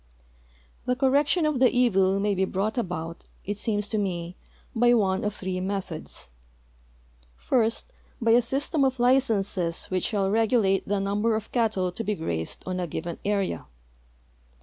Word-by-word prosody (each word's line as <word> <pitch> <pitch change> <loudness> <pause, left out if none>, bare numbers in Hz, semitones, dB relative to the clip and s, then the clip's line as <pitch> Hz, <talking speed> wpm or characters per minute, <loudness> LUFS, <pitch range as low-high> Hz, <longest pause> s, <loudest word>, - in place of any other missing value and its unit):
The 250 - +2
correction 280 +5 +3
of 305 -4 +1
the 255 -1 +6
evil 195 -6 +3
may 205 0 +1
be 190 0 +1
brought 195 +4 -1
about, 170 -7 -4 0.2
it 205 +1 -3
seems 210 -2 -1
to 220 - 0
me, 175 -3 -3 0.4
1)}' 240 +1 +5
one 190 -3 +1
of 210 0 -1
three 185 -1 -3
methods. 185 - -5 1.1
First, 235 - 0 0.3
by 230 -2 +2
a 240 +2 +6
system 275 +4 0
of 260 -2 +1
licenses 210 -9 +1
which 185 -1 0
shall 195 -3 0
regulate 220 -3 +2
the 205 0 +1
number 205 +3 +1
of 220 0 -5
cattle 215 -7 +1
to 225 - -5
be 210 -1 -1
grazed 80 - -4
on 185 0 -3
a 175 - -2
given 170 +2 -5
area. 200 -2 -1
205 Hz, 155 wpm, -26 LUFS, 190-240 Hz, 1.1 s, the